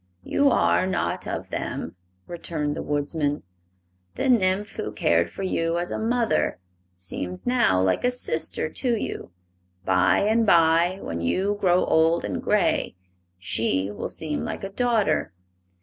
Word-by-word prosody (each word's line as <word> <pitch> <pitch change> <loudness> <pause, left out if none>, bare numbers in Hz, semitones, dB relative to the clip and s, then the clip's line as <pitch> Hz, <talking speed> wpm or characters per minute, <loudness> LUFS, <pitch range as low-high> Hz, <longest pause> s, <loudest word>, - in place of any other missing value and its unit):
"You 285 0 +2
are 185 - +2
not 190 - -2
of - - -5
them," - - -4 0.3
returned 155 -4 -3
the - - -4
Woodsman. 145 0 -1 0.7
"The - - -1
nymph 200 -3 +2
who 105 - -3
cared 85 -5 +2
for 195 - -7
you 165 -2 0
as 175 +1 -2
a - - -2
mother 230 0 0 0.4
seems 90 0 -6
now 245 - +3
like 95 0 +1
a 245 - +3
sister 165 -11 -1
to 235 - -1
you; - - -5 0.6
by 90 -1 +3
and 220 +3 +2
by, 170 -1 +4
when 85 0 -4
you 190 - 0
grow 180 -2 +3
old 165 +1 +2
and - - -3
gray, 210 - +1 0.4
she 95 +1 -1
will 105 - -5
seem 155 -2 -3
like - - -5
a 195 - -4
daughter. 230 - 0
170 Hz, 150 wpm, -24 LUFS, 140-205 Hz, 0.7 s, by